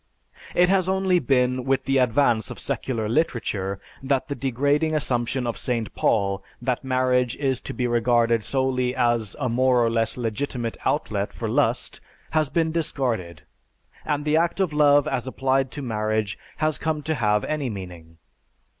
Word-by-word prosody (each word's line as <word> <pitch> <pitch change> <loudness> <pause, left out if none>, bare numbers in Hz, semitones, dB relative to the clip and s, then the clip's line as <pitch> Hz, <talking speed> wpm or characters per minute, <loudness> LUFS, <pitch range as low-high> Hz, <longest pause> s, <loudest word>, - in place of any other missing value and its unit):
It 180 0 +5
has 185 -1 +2
only 190 -1 +2
been 125 -2 +1
with 135 +1 +1
the 135 0 +2
advance 120 -2 +2
of - - -7
secular 115 -5 -2
literature 105 -7 -1 0.2
that 135 0 0
the - - -1
degrading 145 +4 0
assumption 125 -3 -1
of 120 - -2
St. 115 -3 -2
Paul 100 -2 +1 0.2
that 125 +1 -2
marriage 130 -2 +1
is 135 -3 -1
to - - -6
be 125 - -2
regarded 120 -1 +2
solely 130 -1 0
as 120 -5 +1
a 130 - 0
more 125 0 +3
or 115 - +1
less 115 +1 +1
legitimate 120 0 -3
outlet - - -1
for - - -5
lust - - 0 0.3
has 155 -3 +1
been 160 0 +1
discarded, 115 - -2 0.6
and 145 0 -2
the 155 +1 +3
act 170 +3 +1
of 185 -6 +1
love 145 -1 +5
as 125 0 -2
applied 135 0 0
to 145 - -5
marriage 110 -3 -1 0.2
has 155 -1 0
come 155 -2 -2
to 160 - -1
have 105 -6 +1
any 150 -4 -2
meaning. 90 -5 -9
130 Hz, 165 wpm, -24 LUFS, 115-145 Hz, 0.6 s, It